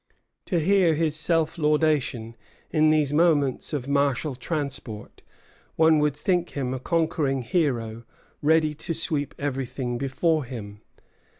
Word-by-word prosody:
To 180 - 0
hear 180 -1 +3
his 155 -1 0
self 165 0 0
laudation 150 -7 +1 0.4
in 155 -1 +4
these 150 -2 +2
moments 150 -5 +2
of 140 -4 -3
martial 140 0 +1
transport 135 -5 -5 0.5
one 160 -1 +5
would 150 -1 +1
think 175 -1 -1
him 130 -2 -1
a 130 - -3
conquering 150 -3 0
hero 120 -5 -1 0.4
ready 155 0 +3
to 165 +2 -5
sweep 150 -2 -2
everything 130 -3 -3
before 150 +3 0
him. 105 -5 -8
150 Hz, 125 wpm, -25 LUFS, 130-160 Hz, 0.5 s, one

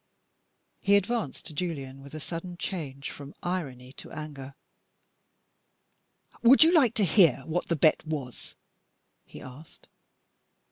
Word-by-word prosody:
He 200 +1 +3
advanced 200 - -1
to - - -7
Julian, 140 -5 -4
with 140 +2 -11
a - - -5
sudden 175 +3 -6
change 145 -8 -5
from 140 0 -10
irony 135 -8 -4
to - - -10
anger. 140 -3 -8 1.9
"Would 255 +5 +8
you 330 +2 +4
like 265 -9 +4
to 210 - +2
hear 165 - +4
what 170 +2 -2
the 170 - +1
bet 155 +1 +3
was?" 145 -6 -6 0.7
he - - -12
asked. 135 +5 -14
155 Hz, 130 wpm, -28 LUFS, 135-185 Hz, 1.9 s, Would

